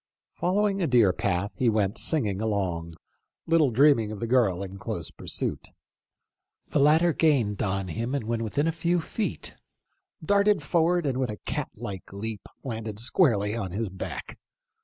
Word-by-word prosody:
Following 195 Hz, +2 st, +1 dB
a 170 Hz, -, +2 dB
deer 115 Hz, -8 st, +4 dB
path, 100 Hz, +2 st, -1 dB
he 125 Hz, -, +4 dB
went 105 Hz, -1 st, 0 dB
singing 105 Hz, -, -1 dB
along, 90 Hz, -6 st, -2 dB, 0.5 s
little 165 Hz, -4 st, +4 dB
dreaming 120 Hz, -3 st, +4 dB
of 105 Hz, -, -6 dB
the 115 Hz, -, -2 dB
girl 115 Hz, -7 st, +2 dB
in 95 Hz, 0 st, -8 dB
close -, -, -5 dB
pursuit. -, -, -4 dB, 1.0 s
The -, -, +1 dB
latter 160 Hz, +4 st, +5 dB
gained 125 Hz, -12 st, +2 dB
on 95 Hz, -1 st, -1 dB
him, 115 Hz, -, -2 dB
and 140 Hz, -, -1 dB
when 115 Hz, 0 st, -1 dB
within 140 Hz, +7 st, 0 dB
a 165 Hz, -, +2 dB
few 170 Hz, +2 st, 0 dB
feet, 210 Hz, +6 st, -4 dB, 0.7 s
darted 200 Hz, +3 st, +3 dB
forward 175 Hz, 0 st, +2 dB
and 130 Hz, -2 st, 0 dB
with 130 Hz, -3 st, 0 dB
a 105 Hz, -, -5 dB
cat -, -, -2 dB
like 95 Hz, -2 st, -7 dB
leap 105 Hz, +1 st, -5 dB, 0.2 s
landed 110 Hz, -4 st, -5 dB
squarely 115 Hz, -, +2 dB
on 100 Hz, -5 st, -3 dB
his 110 Hz, +1 st, -2 dB
back. 95 Hz, 0 st, -7 dB
115 Hz, 160 wpm, -27 LUFS, 100-155 Hz, 1.0 s, latter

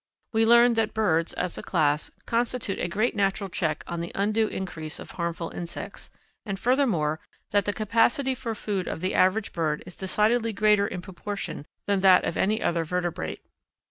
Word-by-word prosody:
We 225 Hz, 0 st, +3 dB
learn 235 Hz, +1 st, +7 dB
that 225 Hz, -2 st, 0 dB
birds, 170 Hz, -7 st, +2 dB
as 180 Hz, -1 st, -3 dB
a -, -, -5 dB
class, 150 Hz, 0 st, +1 dB, 0.2 s
constitute 235 Hz, -3 st, -1 dB
a -, -, 0 dB
great 215 Hz, +7 st, 0 dB
natural 195 Hz, -1 st, 0 dB
check 155 Hz, -3 st, -1 dB
on 170 Hz, -1 st, -4 dB
the 170 Hz, -, -5 dB
undue 215 Hz, +2 st, +2 dB
increase 165 Hz, -6 st, -5 dB
of -, -, -9 dB
harmful 170 Hz, -1 st, -3 dB
insects, 175 Hz, +3 st, -7 dB, 0.3 s
and 195 Hz, -3 st, -4 dB
furthermore 205 Hz, -, +2 dB, 0.3 s
that 205 Hz, -2 st, +2 dB
the 205 Hz, -, +1 dB
capacity 230 Hz, +6 st, +2 dB
for 235 Hz, -3 st, -4 dB
food 200 Hz, -3 st, -3 dB
of -, -, -4 dB
the 185 Hz, -, -1 dB
average 195 Hz, +3 st, +2 dB
bird 155 Hz, -3 st, -1 dB
is 180 Hz, -, -11 dB
decidedly 220 Hz, +4 st, +1 dB
greater 210 Hz, 0 st, +3 dB
in 180 Hz, -2 st, -6 dB
proportion 195 Hz, -5 st, -6 dB, 0.2 s
than 200 Hz, -1 st, +1 dB
that 185 Hz, -1 st, +6 dB
of -, -, -2 dB
any 215 Hz, +3 st, +1 dB
other 170 Hz, -1 st, +1 dB
vertebrate. 165 Hz, -, -3 dB
195 Hz, 175 wpm, -26 LUFS, 170-220 Hz, 0.3 s, learn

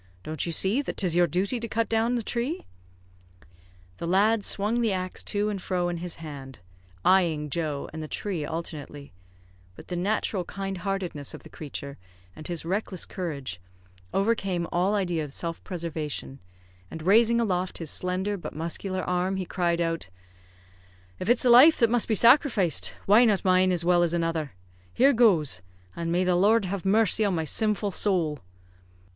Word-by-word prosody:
Don't 155 Hz, +2 st, -3 dB
you -, -, -2 dB
see 195 Hz, -, +1 dB
that 285 Hz, -, -6 dB
'tis 180 Hz, -4 st, +2 dB
your 175 Hz, 0 st, +4 dB
duty 195 Hz, -, -1 dB
to 230 Hz, -, -4 dB
cut 230 Hz, +1 st, -1 dB
down 225 Hz, +2 st, +1 dB
the 235 Hz, -, -2 dB
tree?" 250 Hz, -, -3 dB, 1.3 s
The 170 Hz, -, -4 dB
lad 205 Hz, +4 st, +3 dB
swung 215 Hz, +5 st, 0 dB
the 225 Hz, -3 st, +1 dB
axe 185 Hz, -1 st, -3 dB
to 205 Hz, 0 st, 0 dB
and 200 Hz, -3 st, -4 dB
fro 180 Hz, -1 st, -1 dB
in 175 Hz, -, -3 dB
his 175 Hz, 0 st, -5 dB
hand, 140 Hz, -5 st, -9 dB, 0.5 s
eyeing 165 Hz, -6 st, +2 dB
Joe 150 Hz, -3 st, -2 dB
and 160 Hz, -, -6 dB
the 155 Hz, -, -6 dB
tree 185 Hz, -2 st, -3 dB
alternately; 150 Hz, -, -7 dB, 0.6 s
but -, -, -14 dB
the 180 Hz, -, -3 dB
natural 195 Hz, +1 st, -1 dB
kind 195 Hz, 0 st, -5 dB
heartedness 180 Hz, -7 st, -4 dB
of -, -, -13 dB
the -, -, -14 dB
creature, 140 Hz, -2 st, -8 dB, 0.4 s
and 155 Hz, -, -8 dB
his 170 Hz, -2 st, -4 dB
reckless 190 Hz, 0 st, -2 dB
courage, 140 Hz, -, -5 dB, 0.5 s
overcame 195 Hz, -4 st, 0 dB
all 185 Hz, +4 st, +1 dB
idea 175 Hz, -5 st, -1 dB
of 145 Hz, -, -7 dB
self 165 Hz, +3 st, -4 dB
preservation, 160 Hz, -6 st, -5 dB, 0.5 s
and 160 Hz, -, -8 dB
raising 230 Hz, +5 st, +4 dB
aloft 185 Hz, -5 st, -1 dB
his 165 Hz, -3 st, -3 dB
slender 185 Hz, +3 st, -1 dB
but 175 Hz, -, -8 dB
muscular 185 Hz, +4 st, -3 dB
arm, 180 Hz, +1 st, -1 dB
he 190 Hz, -1 st, -3 dB
cried 170 Hz, -1 st, -1 dB
out, 165 Hz, -, -2 dB, 1.1 s
"If 185 Hz, -, -3 dB
it's 240 Hz, +1 st, +3 dB
a -, -, +5 dB
life 275 Hz, +7 st, +8 dB
that 230 Hz, -2 st, +3 dB
must 240 Hz, -2 st, +2 dB
be 220 Hz, -, +1 dB
sacrificed, 230 Hz, -, +4 dB
why 210 Hz, +5 st, +6 dB
not 205 Hz, -4 st, +1 dB
mine 185 Hz, 0 st, +4 dB
as 175 Hz, -2 st, -1 dB
well 175 Hz, 0 st, +4 dB
as 170 Hz, -1 st, +1 dB
another? 165 Hz, -5 st, -1 dB, 0.4 s
Here 275 Hz, +3 st, +5 dB
goes! 170 Hz, -, +3 dB, 0.3 s
and 165 Hz, 0 st, -3 dB
the 180 Hz, 0 st, +2 dB
Lord 205 Hz, +4 st, +3 dB
have 195 Hz, 0 st, -4 dB
mercy 215 Hz, +2 st, +3 dB
on 200 Hz, -3 st, +1 dB
my 160 Hz, -, -1 dB
sinful 210 Hz, +3 st, 0 dB
sowl!" 170 Hz, -8 st, 0 dB
185 Hz, 175 wpm, -26 LUFS, 165-210 Hz, 1.3 s, life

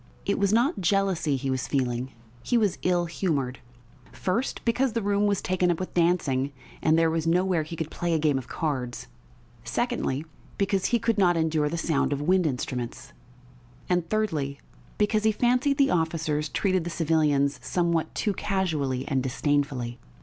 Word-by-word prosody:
It -, -, 0 dB
was 200 Hz, -1 st, +2 dB
not 235 Hz, -, +2 dB
jealousy 185 Hz, -5 st, +1 dB
he 135 Hz, 0 st, -2 dB
was 130 Hz, 0 st, -2 dB
feeling. 130 Hz, -2 st, -1 dB, 0.3 s
He 245 Hz, -, +1 dB
was 210 Hz, -5 st, +1 dB
ill 175 Hz, -1 st, +2 dB
humoured 145 Hz, -7 st, -2 dB, 0.5 s
first, 225 Hz, +8 st, -2 dB
because 245 Hz, +1 st, +1 dB
the 230 Hz, -, 0 dB
room 205 Hz, +1 st, +2 dB
was 200 Hz, -2 st, 0 dB
taken 180 Hz, -1 st, +1 dB
up 170 Hz, -, +1 dB
with 185 Hz, -, -5 dB
dancing 155 Hz, -6 st, +1 dB, 0.3 s
and 160 Hz, 0 st, +3 dB
there 165 Hz, -1 st, +3 dB
was 165 Hz, 0 st, -1 dB
nowhere 180 Hz, 0 st, +2 dB
he 155 Hz, +2 st, -6 dB
could 160 Hz, -1 st, -4 dB
play 175 Hz, -2 st, -1 dB
a -, -, +3 dB
game 150 Hz, -3 st, +2 dB
of 130 Hz, -, -10 dB
cards; 130 Hz, -7 st, -3 dB, 0.6 s
secondly, 135 Hz, +4 st, -1 dB, 0.3 s
because 195 Hz, -1 st, +1 dB
he 240 Hz, -, +2 dB
could 230 Hz, -1 st, 0 dB
not 175 Hz, -3 st, +4 dB
endure 160 Hz, -2 st, +1 dB
the 170 Hz, -, -3 dB
sound 160 Hz, -3 st, +1 dB
of 140 Hz, -, -2 dB
wind 180 Hz, +3 st, +2 dB
instruments; 125 Hz, -3 st, -4 dB, 0.7 s
and, 175 Hz, -2 st, 0 dB
thirdly, 155 Hz, -11 st, -1 dB, 0.4 s
because 210 Hz, +1 st, +2 dB
he 220 Hz, -, +4 dB
fancied 250 Hz, +5 st, +2 dB
the 275 Hz, -1 st, +4 dB
officers 160 Hz, -3 st, 0 dB
treated 185 Hz, 0 st, +1 dB
the 175 Hz, -, -4 dB
civilians 150 Hz, -4 st, +1 dB
somewhat 170 Hz, -2 st, 0 dB
too 205 Hz, -, 0 dB
casually 155 Hz, -11 st, -1 dB
and 135 Hz, -3 st, +1 dB
disdainfully. 130 Hz, -2 st, -1 dB
165 Hz, 170 wpm, -26 LUFS, 145-195 Hz, 0.7 s, not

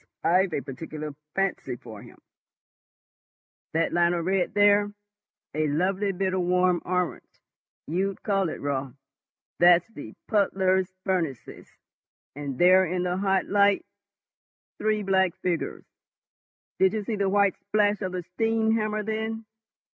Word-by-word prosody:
I've 180 Hz, +1 st, +3 dB
a 140 Hz, -, -1 dB
particular 150 Hz, +3 st, -7 dB, 0.2 s
fancy 195 Hz, -9 st, -1 dB
for 110 Hz, -4 st, -11 dB
him. -, -, -15 dB, 1.6 s
That 165 Hz, 0 st, +1 dB
line 175 Hz, 0 st, +3 dB
of 170 Hz, -1 st, -2 dB
red 190 Hz, +1 st, 0 dB
there—a 205 Hz, -4 st, 0 dB
lovely 190 Hz, +7 st, 0 dB
bit 190 Hz, 0 st, -1 dB
of 185 Hz, -, 0 dB
warm 180 Hz, 0 st, +2 dB
orange 180 Hz, -1 st, -1 dB, 0.6 s
you'd 190 Hz, +4 st, -2 dB
call 195 Hz, -4 st, +1 dB
it, -, -, -6 dB
Raut—that's 140 Hz, -, 0 dB
the -, -, -9 dB
puddlers' 190 Hz, -3 st, +1 dB
furnaces, 165 Hz, -, -3 dB, 0.7 s
and 140 Hz, -3 st, -5 dB
there, 185 Hz, +3 st, +6 dB
in 180 Hz, 0 st, -1 dB
the 180 Hz, 0 st, -1 dB
hot 195 Hz, -1 st, +1 dB
light, 200 Hz, 0 st, +3 dB, 0.9 s
three 215 Hz, -1 st, 0 dB
black 190 Hz, -2 st, +2 dB
figures—did 185 Hz, +2 st, -4 dB
you 215 Hz, -1 st, -2 dB
see 220 Hz, +2 st, -3 dB
the 200 Hz, -1 st, 0 dB
white 200 Hz, 0 st, +3 dB
splash 205 Hz, 0 st, +1 dB
of 185 Hz, -2 st, -3 dB
the 180 Hz, -1 st, -3 dB
steam 225 Hz, +5 st, 0 dB
hammer 215 Hz, -1 st, -1 dB
then? 220 Hz, +1 st, -3 dB
190 Hz, 125 wpm, -26 LUFS, 175-205 Hz, 1.6 s, there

